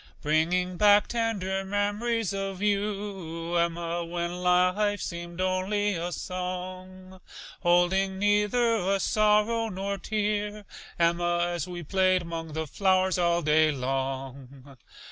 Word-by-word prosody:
Bringing 175 +4 +1
back 205 +1 +5
tender 200 -5 -1
mem'ries 205 +2 -1
of 195 -1 -4
you, 200 -5 -2
Emma, 170 0 0
When 170 +1 -4
life 180 +3 +2
seemed 170 0 -6
only 190 +3 0
a 175 0 -3
song, 185 +1 -6 0.4
Holding 190 +2 +2
neither 210 +4 +2
a 195 0 0
sorrow 215 +3 +2
nor 195 0 -4
tear, 210 0 -2 0.3
Emma, 175 0 +2
As 175 -3 -3
we 175 -1 -6
played 185 +2 +2
'mong 165 -2 -6
the 160 0 -2
flowers 185 +3 +1
all 170 0 +2
day 155 +1 +4
long. 135 0 -5
185 Hz, 115 wpm, -27 LUFS, 170-205 Hz, 0.4 s, back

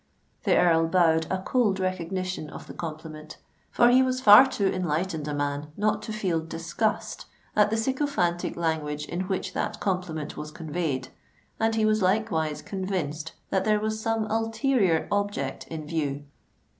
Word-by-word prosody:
The - - +4
Earl 165 -2 +4
bowed 165 -2 +3
a 190 0 -2
cold 210 -6 +1
recognition 185 -2 -3
of - - -9
the - - -10
compliment,—for 155 +8 -2
he 255 +1 +6
was 255 0 +1
far 250 +2 +9
too 220 -6 -1
enlightened 175 -3 -1
a 150 - -2
man 145 0 -2
not 210 +1 +1
to - - -6
feel 190 -6 0
disgust 165 +7 -3 0.3
at 210 0 +5
the 220 - 0
sycophantic 225 -8 0
language 155 -3 -2
in 175 +4 -4
which 190 -1 -2
that 215 - -2
compliment 180 -6 -2
was 150 - -6
conveyed—and 160 +7 -4
he 220 -1 +2
was 215 0 +2
likewise 185 -6 0
convinced 175 -5 -3 0.2
that 190 - +2
there 215 -1 +2
was 215 +1 -2
some 225 0 0
ulterior 225 - +1
object 205 -10 -2
in 155 -2 -6
view. 145 -3 -2
185 Hz, 150 wpm, -26 LUFS, 160-215 Hz, 0.3 s, far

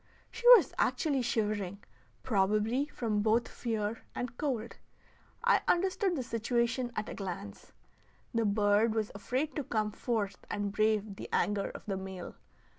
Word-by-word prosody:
She 465 +1 -2
was - - -1
actually 285 -5 +1
shivering, 205 -4 -1 0.4
probably 215 +5 +1
from 220 -7 -1
both 225 +2 +2
fear 220 -2 -3
and 245 0 -4
cold. 240 -6 -3 0.7
I - - +4
understood 375 +1 +2
the 265 - -2
situation 235 +1 0
at 210 - -2
a - - -5
glance; 180 - -7 0.6
the 230 -1 +2
bird 205 +2 +3
was 215 -2 -1
afraid 255 +9 -2
to 295 - -1
come 215 -3 -1
forth 210 -4 -2
and 205 -1 -2
brave 215 -1 +1
the - - -7
anger 205 -1 +1
of - - -10
the 195 -2 -2
male. 190 -2 -7
220 Hz, 145 wpm, -31 LUFS, 205-245 Hz, 0.7 s, I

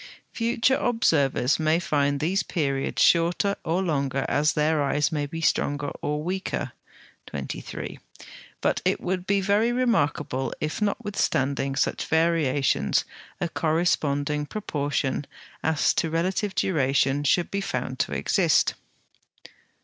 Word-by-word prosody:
Future 235 +3 +2
observers 145 - +2
may 155 +1 +3
find 145 -4 0
these 180 +6 +1
periods 140 -5 -1
shorter 175 +4 +3
or 175 +4 0
longer 140 -5 -1
as 150 +2 +2
their 155 0 +2
eyes 145 +2 +1
may 145 -2 -1
be 165 +3 -6
stronger 145 -2 0
or 150 +1 -2
weaker 190 +3 -3 0.6
(23), - - -6 0.6
but - - +1
it - - +1
would 180 0 -3
be 200 0 +3
very 205 +4 +2
remarkable 150 - 0
if, 155 +7 -3
notwithstanding 140 - 0
such 135 - -1
variations, 160 -4 +2 0.3
a 175 - 0
corresponding 155 -3 0
proportion 145 -8 -2 0.4
as 160 -2 +2
to 165 - 0
relative 185 +5 -1
duration 135 -4 +1
should 170 +4 +2
be 200 - -1
found - - -3
to - - 0
exist. - - +2
155 Hz, 120 wpm, -25 LUFS, 145-185 Hz, 0.6 s, may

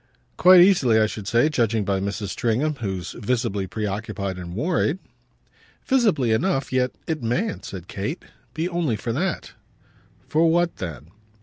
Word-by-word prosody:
"Quite 180 0 +8
easily, 145 - +5
I 110 - +4
should 105 -2 -6
say, 120 +6 +3
judging 115 -8 0
by 100 -1 0
Mrs. 100 0 -3
Stringham, 130 +8 0
who's 95 -4 -3
visibly 115 -4 -2
preoccupied 100 -1 -4
and 90 0 -7
worried." 160 - 0 0.9
"Visibly 210 - +2
enough. 135 +3 0
Yet 125 0 +1
it 160 -2 -3
mayn't," 145 - -2
said 90 -3 -8
Kate, 105 - -5 0.3
"be 160 +2 -1
only 170 -9 -1
for 115 +2 -3
that." 175 +7 -2 0.8
"For 165 +2 +3
what 175 +1 +1
then?" 85 -3 -7
115 Hz, 145 wpm, -23 LUFS, 100-160 Hz, 0.9 s, Quite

